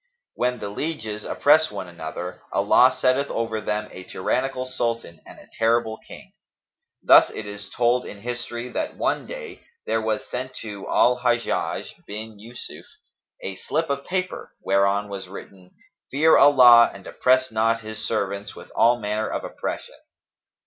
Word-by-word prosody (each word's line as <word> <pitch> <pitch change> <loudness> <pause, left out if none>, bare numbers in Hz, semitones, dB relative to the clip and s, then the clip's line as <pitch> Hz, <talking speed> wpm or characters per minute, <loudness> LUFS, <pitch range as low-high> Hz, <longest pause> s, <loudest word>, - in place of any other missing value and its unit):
When 125 0 0
the 105 - -5
lieges 110 -4 -4
oppress 155 +2 +4
one 95 - -6
another, 85 +1 -7
Allah - - +5
setteth 130 +2 +2
over 115 -1 -2
them 105 0 -2
a 90 - -9
tyrannical 130 +8 -2
Sultan 115 -9 -3
and - - -12
a - - -15
terrible 115 -1 +2
King. - - -12 0.7
Thus - - +7
it 110 - -7
is 105 -1 -7
told 125 +1 +2
in 100 - -10
history 120 0 -4
that - - -4
one - - -1
day - - -8 0.2
there 110 - 0
was 110 -1 -2
sent 130 +1 -5
to 105 -3 -7
Al 125 0 +3
Hajjαj 120 -1 -1
bin 110 0 -7
Yϊsuf 115 +3 -10 0.6
a 95 - -4
slip 160 +6 -2
of 140 0 -2
paper, 185 0 -3
whereon 100 +1 +2
was 100 -2 -7
written, 95 -1 -11 0.4
'Fear 155 +4 +4
Allah 125 -4 +8
and 95 -1 -13
oppress 130 0 +2
not 115 +1 +1
His 110 0 -7
servants 100 -2 -2
with - - -12
all 120 +1 +4
manner 105 0 -2
of - - -3
oppression.' - - -6
115 Hz, 155 wpm, -24 LUFS, 105-125 Hz, 0.7 s, Allah